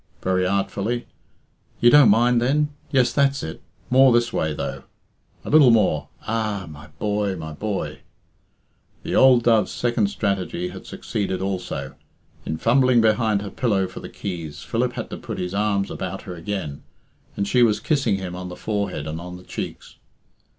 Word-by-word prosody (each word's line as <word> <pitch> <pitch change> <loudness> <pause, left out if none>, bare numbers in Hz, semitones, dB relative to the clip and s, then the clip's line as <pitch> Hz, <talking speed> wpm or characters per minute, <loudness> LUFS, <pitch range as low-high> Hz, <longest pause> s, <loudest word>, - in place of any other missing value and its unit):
(very 90 0 +1
artfully) 100 +4 -1 0.7
"you 120 - +6
don't 145 -5 +8
mind 120 +3 +4
then? 145 +4 +2 0.2
Yes, 130 -3 +2
that's 140 -1 +2
it; 80 - -6 0.3
more 130 0 +7
this 120 0 +2
way, 80 - 0
though, 75 - -4 0.6
a - - -4
little 150 -4 +7
more 105 -10 +3 0.2
ah! 110 -4 -2
My 75 -1 -11
boy! 105 -2 -1
my 80 -3 -6
boy!" 105 +5 -4 1.0
The - - -4
old 130 -3 +6
dove's 115 -3 +3
second 120 -4 0
strategy 100 -3 -2
had 95 +1 -10
succeeded 100 -3 -3
also. 95 -1 -4 0.5
In 80 - -2
fumbling 125 +3 +4
behind 110 -2 +2
her 100 - -6
pillow 100 -6 +1
for - - -8
the - - -8
keys, 85 -6 -6
Philip - - -1
had - - -6
to - - -5
put - - -6
his 90 +1 -3
arms 100 -1 0
about 95 +1 -5
her 95 - -7
again, 85 -4 -5 0.6
and 100 - 0
she 125 +4 +3
was 110 -3 +4
kissing 135 -6 +1
him 95 -2 -5
on 90 0 -6
the 90 - -7
forehead 100 -9 -3
and 80 +2 -5
on 90 +1 -8
the 90 - -14
cheeks. - - -7
100 Hz, 170 wpm, -23 LUFS, 90-120 Hz, 1.0 s, don't